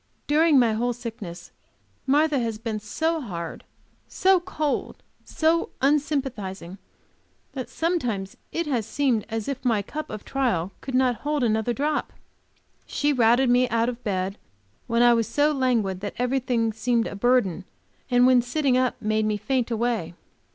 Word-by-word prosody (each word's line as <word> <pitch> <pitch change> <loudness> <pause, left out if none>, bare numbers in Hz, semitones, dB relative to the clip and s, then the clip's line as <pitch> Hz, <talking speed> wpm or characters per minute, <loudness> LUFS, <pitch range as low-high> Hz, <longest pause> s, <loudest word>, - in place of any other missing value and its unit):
During 305 0 +4
my 235 -4 +4
whole 240 +3 0
sickness, 225 -7 -8 0.6
Martha 295 +1 +3
has 225 -2 -2
been 220 -1 -4
so 320 +10 -1
hard, 170 - -6 0.4
so 380 0 +3
cold, 310 -5 -3 0.2
so 325 +1 +1
unsympathizing 260 - -1 0.7
that 260 -2 -6
sometimes 245 - -2 0.2
it 335 - -2
has 245 -7 -1
seemed 245 -4 0
as 225 -2 -3
if 275 -1 -4
my 225 -5 +1
cup 305 +9 -6
of 215 -1 -7
trial 230 -10 0
could 265 -1 -4
not 255 -2 +3
hold 295 +1 -1
another 220 0 +1
drop. 295 +5 -1 0.7
She 290 0 +1
routed 240 +1 +4
me 250 0 +3
out 230 +1 +1
of 245 0 -7
bed 195 -1 -2 0.5
when 235 +1 +3
I 240 0 +7
was 230 -2 +1
so 290 +6 +2
languid 240 -9 0
that 205 +1 -5
everything 245 -2 0
seemed 230 +1 +1
a - - -5
burden, 240 -4 +2 0.5
and 245 0 +5
when 255 -1 +6
sitting 260 +2 0
up 255 -1 +1
made 215 0 0
me 210 -1 0
faint 255 +2 -1
away. 230 -7 -1
245 Hz, 155 wpm, -25 LUFS, 220-275 Hz, 0.7 s, I